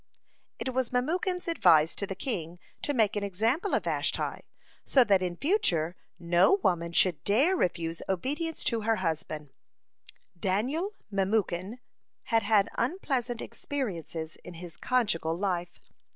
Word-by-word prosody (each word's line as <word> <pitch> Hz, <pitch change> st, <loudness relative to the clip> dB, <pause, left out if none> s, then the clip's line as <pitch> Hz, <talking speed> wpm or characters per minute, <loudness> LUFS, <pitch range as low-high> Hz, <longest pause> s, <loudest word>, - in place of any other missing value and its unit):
(42) -, -, -18 dB
It 260 Hz, -, -2 dB
was 260 Hz, -1 st, 0 dB
Memucan's 355 Hz, +8 st, 0 dB
advice 160 Hz, -, +5 dB
to 200 Hz, -, -2 dB
the 195 Hz, -, -4 dB
king 175 Hz, -, -4 dB, 0.2 s
to -, -, -1 dB
make 220 Hz, -6 st, +2 dB
an 205 Hz, -, -1 dB
example 225 Hz, -, 0 dB
of -, -, 0 dB
Vashti, -, -, -1 dB, 0.4 s
so 265 Hz, -, +5 dB
that 200 Hz, -5 st, +3 dB
in 180 Hz, -1 st, -2 dB
future 180 Hz, -, +1 dB, 0.2 s
no 175 Hz, -, +4 dB
woman 170 Hz, -2 st, +1 dB
should 170 Hz, -1 st, +3 dB
dare 275 Hz, -, +3 dB
refuse 170 Hz, -, -1 dB
obedience 290 Hz, -, -2 dB
to 230 Hz, -2 st, +1 dB
her 225 Hz, +1 st, +2 dB
husband. 155 Hz, -5 st, -3 dB, 0.9 s
Daniel 265 Hz, -, -1 dB, 0.2 s
Memucan 195 Hz, +1 st, 0 dB, 0.5 s
had 225 Hz, -1 st, +2 dB
had 205 Hz, -1 st, +3 dB
unpleasant 250 Hz, -, -1 dB
experiences 170 Hz, -, -4 dB
in 180 Hz, -, -9 dB
his 170 Hz, -1 st, -9 dB
conjugal 205 Hz, -10 st, 0 dB
life. 175 Hz, -2 st, -2 dB
200 Hz, 135 wpm, -29 LUFS, 175-260 Hz, 0.9 s, advice